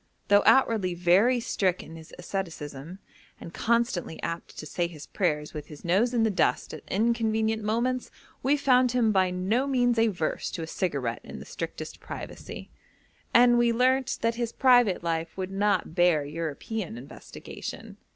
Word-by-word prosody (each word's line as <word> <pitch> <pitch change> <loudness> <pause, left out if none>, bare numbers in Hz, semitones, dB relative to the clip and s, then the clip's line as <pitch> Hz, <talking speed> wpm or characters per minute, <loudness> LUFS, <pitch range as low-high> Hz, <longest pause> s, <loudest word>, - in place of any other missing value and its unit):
Though 205 0 +6
outwardly 220 -9 +4
very 190 +9 +4
strict 190 -5 -1
in 165 - -11
his 160 -1 -12
asceticism, 165 -4 -6 0.4
and 165 - -10
constantly 230 -8 0
apt 170 0 -5
to - - -6
say 170 +3 -1
his 155 -4 -11
prayers 150 -6 -1
with 150 -1 -7
his 150 0 -12
nose 200 +8 +2
in 235 -3 +1
the 220 - +2
dust 195 - 0
at - - -7
inconvenient 220 0 0
moments, 240 +4 -1 0.3
we 280 +3 +2
found 255 -3 +3
him 235 -3 +3
by 190 -2 +3
no 195 +9 0
means 245 -3 +2
averse 200 -8 0
to 165 - -4
a - - -3
cigarette 140 - -2
in - - -9
the - - -9
strictest - - -6
privacy, - - -8 0.6
and 240 0 +6
we 240 0 +3
learnt 260 +2 +2
that 230 0 +2
his 235 -1 -1
private 245 -9 +4
life 165 0 -2
would 190 0 -4
not 200 -3 0
bear 170 -4 +3
European 165 - -5
investigation. 125 +3 -9
195 Hz, 160 wpm, -27 LUFS, 165-235 Hz, 0.6 s, Though